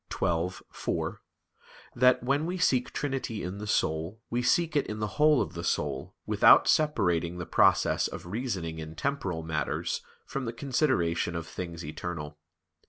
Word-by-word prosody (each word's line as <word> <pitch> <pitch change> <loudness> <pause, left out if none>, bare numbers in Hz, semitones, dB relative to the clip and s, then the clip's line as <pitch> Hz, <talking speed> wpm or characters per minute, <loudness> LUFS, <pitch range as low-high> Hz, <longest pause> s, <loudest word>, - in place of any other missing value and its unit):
xii, 85 +1 0 0.2
4) - - -3 0.7
that 125 +1 +4
"when 140 +5 +1
we 180 +1 -2
seek 130 -8 +2
trinity 135 -6 -3
in 90 +3 -5
the 105 - -6
soul, 80 +1 0
we 120 +1 +1
seek 160 +5 +2
it 145 - +2
in 105 - -4
the 105 +7 -4
whole 150 -2 +6
of 80 - -8
the 85 -1 -5
soul, 75 -5 -2
without - - +6
separating 90 - +2
the 90 - -4
process - - +3
of - - -8
reasoning 90 -6 -3
in 80 0 -7
temporal 95 - -2
matters 75 -4 -2 0.2
from 135 -1 -4
the 115 - -3
consideration 115 - 0
of 85 -1 -3
things 85 -1 -6
eternal." 75 -1 -6
95 Hz, 160 wpm, -29 LUFS, 80-130 Hz, 0.7 s, whole